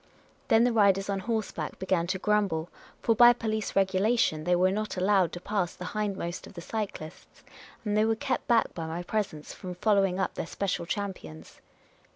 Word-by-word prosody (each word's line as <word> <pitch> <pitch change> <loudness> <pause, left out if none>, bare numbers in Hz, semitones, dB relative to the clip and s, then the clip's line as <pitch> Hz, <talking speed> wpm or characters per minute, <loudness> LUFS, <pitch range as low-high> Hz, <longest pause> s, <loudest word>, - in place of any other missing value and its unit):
Then 225 +1 +5
the 245 -1 +2
riders 200 -2 +3
on 195 - -1
horseback 220 +1 -3
began 185 -2 0
to 190 +2 -1
grumble; 190 -5 0 0.3
for 230 - +4
by 240 +2 +8
police 220 -3 -3
regulation 195 -3 +2
they 175 0 +3
were 185 +1 +3
not 210 0 -3
allowed 190 -1 +3
to 175 - -5
pass 190 -2 -2
the 180 - -7
hindmost 195 -4 -3
of - - -14
the - - -6
cyclists; 195 -6 -6 0.4
and 210 -1 0
they 215 +1 +4
were 225 0 +2
kept 260 +4 -2
back 235 -2 +3
by 165 -2 -5
my 165 +2 -4
presence 180 -7 -3
from 180 -1 -7
following 195 -1 +2
up 190 - -1
their - - -4
special 180 -3 -2
champions. 170 - -6
195 Hz, 185 wpm, -28 LUFS, 180-215 Hz, 0.4 s, by